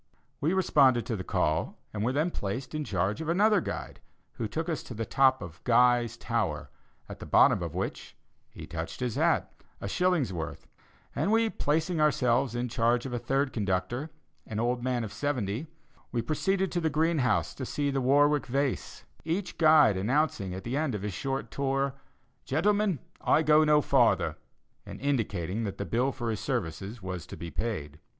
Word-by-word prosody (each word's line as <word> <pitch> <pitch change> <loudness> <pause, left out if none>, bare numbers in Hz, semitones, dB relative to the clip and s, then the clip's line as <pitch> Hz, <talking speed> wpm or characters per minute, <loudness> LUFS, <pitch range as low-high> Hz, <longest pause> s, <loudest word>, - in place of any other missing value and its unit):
We 155 +5 +1
responded 135 - +4
to 115 - -2
the 95 - -4
call, 80 -3 0 0.2
and 105 -1 -2
were 120 - +1
then 155 +6 0
placed 105 +6 -4
in 155 0 -2
charge 100 - -1
of 160 - -4
another 205 +3 +4
guide, - - -6 0.3
who 115 - -4
took 160 +9 -3
us 160 -4 -2
to 120 - -9
the 115 +1 -3
top 130 -1 +3
of 85 -2 -11
"Guy's 120 -1 +3
Tower," - - -2 0.4
at - - -9
the - - -8
bottom - - +5
of - - -4
which - - -4 0.3
he - - -10
touched 80 0 -6
his 125 -3 -1
hat - - +1 0.3
a - - -5
shilling's 175 - +1
worth; 80 -3 -6 0.5
and 225 +1 +1
placing 160 +2 +1
ourselves 130 -4 +2
in 120 +1 -1
charge 120 +1 +1
of 130 - -5
a 120 - -1
third 135 +2 0
conductor, 105 - -1 0.4
an 110 - -4
old 120 +1 0
man 125 -2 0
of 110 - -6
seventy, 130 -2 -2 0.4
we 120 -2 -1
proceeded 190 +5 0
to 175 - -1
the 160 - +1
Greenhouse 155 -3 +1
to 130 - -7
see 145 +2 -1
the 135 -1 0
Warwick 145 +2 +3
Vase 135 +1 -2 0.2
each 180 +4 -3
guide 155 - +6
announcing 110 -2 0
at 95 - -7
the 120 +3 -3
end 150 -5 0
of 100 - -5
his 105 -2 -3
short 135 +6 -3
tour: 135 0 0 0.5
"Gentlemen, 200 +4 +1 0.3
I 160 - +4
go 155 0 +5
no 150 -1 +5
farther," - - +3 0.5
and - - -9
indicating 110 - -1
that 100 - -5
the 100 - -3
bill 125 +6 +1
for 120 -3 -3
his 110 - -3
services 100 - -4
was 90 -3 -5
to - - -9
be 85 -1 -7
paid. 80 -11 -4
130 Hz, 185 wpm, -29 LUFS, 110-150 Hz, 0.5 s, guide